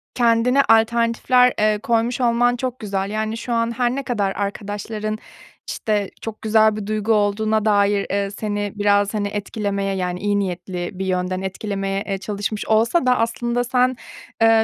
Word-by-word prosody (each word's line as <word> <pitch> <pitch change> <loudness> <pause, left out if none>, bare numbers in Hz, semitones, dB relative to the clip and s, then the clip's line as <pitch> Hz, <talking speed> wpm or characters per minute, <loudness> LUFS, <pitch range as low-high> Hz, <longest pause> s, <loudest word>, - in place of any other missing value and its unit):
kendine 240 +3 +3
alternatifler, 235 +2 +3
eee, 215 0 +2
koymuş 235 +1 0
olman 245 0 +3
çok 255 0 -4
güzel. 195 -2 -2
Yani, 220 +1 -2
şu 240 +1 -4
an 230 0 +1
her 245 0 +1
ne 275 - -3
kadar 205 -7 -1
arkadaşların, 210 +2 -4 0.5
işte, 205 -3 -1
çok 225 -1 -7
güzel 220 0 +4
bir 210 -1 -5
duygu 215 +1 -1
olduğuna 215 +1 +1
dair, 205 -1 +3
eee, 200 0 -1
seni 205 -1 -3
biraz, 205 0 +2
hani, 205 -1 -1
etkilemeye, 200 -1 -2
yani, 180 -1 -2
iyi 205 +1 0
niyetli 180 -2 -3
bir 190 - -2
yönden 185 0 -1
etkilemeye, 195 0 -3
eee, 195 -1 -1
çalışmış 205 +1 -4
olsa 230 +8 +3
da 250 0 +4
aslında 235 +1 0
sen, 250 +1 +2 0.5
eee, 225 0 +5
215 Hz, 160 wpm, -21 LUFS, 200-230 Hz, 0.5 s, eee